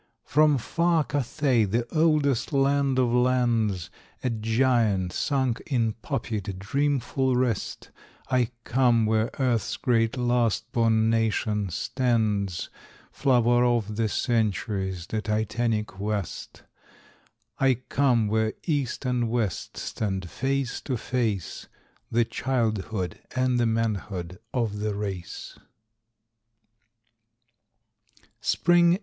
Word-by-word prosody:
From 150 0 +4
far 170 +5 +1
Cathay, 140 -3 +1
the 115 +4 0
oldest 155 -6 +2
land 140 -1 +2
of 125 -2 +3
lands, 120 -7 +1 0.3
A 125 - 0
giant 110 -4 +1
sunk 130 -5 0
in 115 -5 +1
poppied, 105 -9 -3
dreamful 130 +3 0
rest, 125 -4 -2 0.4
I 125 -3 +2
come 120 -2 +3
where 110 +1 +1
earth's 125 -4 0
great 115 0 +1
last 120 -1 +1
born 115 -1 +3
nation 105 -2 0
stands, 105 -3 -1 0.4
Flower 120 -3 +3
of 115 -4 +1
the 110 0 0
centuries, 100 -6 -1
the 110 +2 -3
titanic 110 -1 -1
West. 105 -3 -4 1.0
I 135 -1 +4
come 125 -2 +1
where 110 +1 +1
East 140 -5 -1
and 125 -2 0
West 110 -7 -2
stand 95 -5 -3
face 135 -1 -1
to 130 -3 -2
face, 110 -7 -2 0.4
The 115 0 +2
childhood 110 -8 -2 0.2
and 130 -1 +2
the 120 - +3
manhood 105 -5 -2
of 110 -5 -1
the 105 -1 -2
race. 100 -4 -6
115 Hz, 100 wpm, -26 LUFS, 105-130 Hz, 1.0 s, From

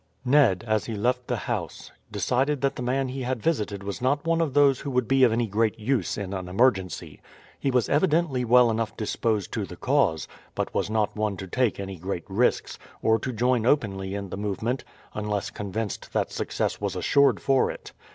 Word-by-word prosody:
Ned, 125 -9 +4
as 110 -2 0
he 115 - -4
left 125 +4 0
the - - 0
house, - - -4 0.2
decided 135 +3 0
that 140 0 +1
the - - -6
man 130 +2 0
he 130 +1 -5
had 130 -1 -2
visited 105 -8 -1
was 100 +4 -5
not 140 +4 +1
one 165 0 +2
of 150 -4 -1
those 140 -2 +5
who 145 - -5
would 125 -2 0
be 135 0 +4
of 120 - +6
any 115 +1 +1
great 110 +1 0
use 115 -2 -1
in 100 -1 -4
an 95 -2 -4
emergency. 95 - 0 0.4
He 140 - 0
was 125 -3 +2
evidently 155 -4 +2
well 125 0 +5
enough 115 0 -2
disposed 110 -1 -1
to - - -2
the - - -8
cause, 80 -1 +1 0.3
but - - -2
was - - -1
not 110 -1 0
one 105 -2 -1
to 95 - -6
take 120 +4 0
any 95 -1 -5
great 90 0 -4
risks, 105 +6 0 0.2
or 110 0 +3
to 130 - -3
join 125 0 +1
openly 95 -8 0
in 100 -1 -5
the - - -5
movement 105 +5 -2 0.3
unless 105 -1 -2
convinced 105 +1 -5
that - - 0
success - - -2
was - - -2
assured 140 0 +3
for 135 -1 +2
it. - - -8
115 Hz, 200 wpm, -26 LUFS, 100-130 Hz, 0.4 s, of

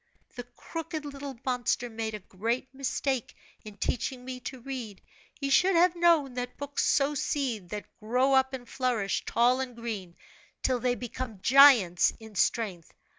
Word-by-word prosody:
The 245 -1 -6
crooked 325 -2 -5
little 280 -3 -7
monster 250 -1 0
made 220 -1 -4
a - - -6
great 230 +8 -3
mistake 270 -2 -2 0.3
in 210 -1 -11
teaching 250 +4 -2
me 255 -1 -6
to 260 +1 -7
read, 240 -6 -6 0.4
he 275 -1 -3
should 365 +6 +4
have 350 +1 +4
known 335 -6 +3
that 245 0 -5
books 285 0 -2
sow 280 +1 +3
seed 255 -9 -2
that 210 +1 -5
grow 250 +5 +2
up 265 0 +4
and 255 -2 -7
flourish 240 -7 -1
tall 245 +2 +3
and 255 -2 -4
green, 210 -7 -6 0.5
till 255 -2 +1
they 245 +1 +1
become 245 -3 -6
giants 250 -10 +6
in 220 -1 -12
strength. 190 -3 0
250 Hz, 160 wpm, -28 LUFS, 225-275 Hz, 0.5 s, giants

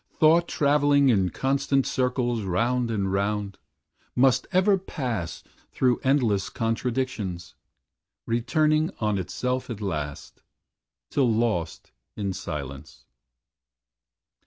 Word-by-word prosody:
Thought 165 +2 +5
Travelling 145 -1 +3
in 95 -6 +3
constant 135 +3 0
circles, 125 -2 0
round 115 +6 0
and 100 -4 -1
round, 100 0 -1 0.6
Muist 130 0 +3
ever 190 +2 +4
pass 120 - -4 0.3
through 125 -2 +2
endless 120 -8 +1
contradictions, 115 -7 -2 0.7
Returning 155 +7 +1
on 105 -3 0
itself 125 +8 -3
at 115 -4 -5
last, 75 -8 -5 0.7
till 130 -5 +2
lost 110 -7 -1 0.2
In 100 -2 -2
silence. 70 -7 -7
120 Hz, 95 wpm, -25 LUFS, 100-135 Hz, 0.7 s, Thought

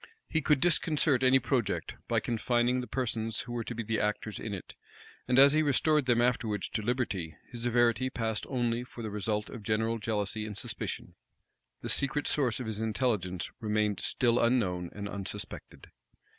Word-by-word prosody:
He 160 - 0
could 150 -1 +3
disconcert 150 -5 +3
any 130 0 +6
project, 120 -4 -1
by - - +2
confining 120 +2 +1
the 125 - -6
persons 115 -3 -1
who 125 - -8
were 120 -1 -2
to 120 - -6
be 115 - -3
the 110 +1 -1
actors 105 0 -2
in 110 - -5
it; 95 -4 -7 0.5
and 125 +1 +2
as 140 +1 +8
he 155 - +4
restored 150 0 +2
them 120 -2 +4
afterwards 110 -5 0
to 110 - -2
liberty, 105 - -2
his 120 -2 -6
severity 120 +1 +2
passed 110 -3 -2
only 120 -2 0
for 120 -1 -9
the 110 - -4
result 105 +1 -2
of 120 - -7
general 110 +2 0
jealousy 105 0 -2
and 105 -2 -6
suspicion, - - -4 0.7
The - - -5
secret 140 +1 +2
source 130 -6 +1
of 125 - -4
his 110 -1 -3
intelligence 105 -6 -1
remained 105 -2 0
still 120 -1 +2
unknown 95 -8 +1
and 100 0 -6
unsuspected. 100 0 -7
115 Hz, 175 wpm, -30 LUFS, 105-125 Hz, 0.7 s, as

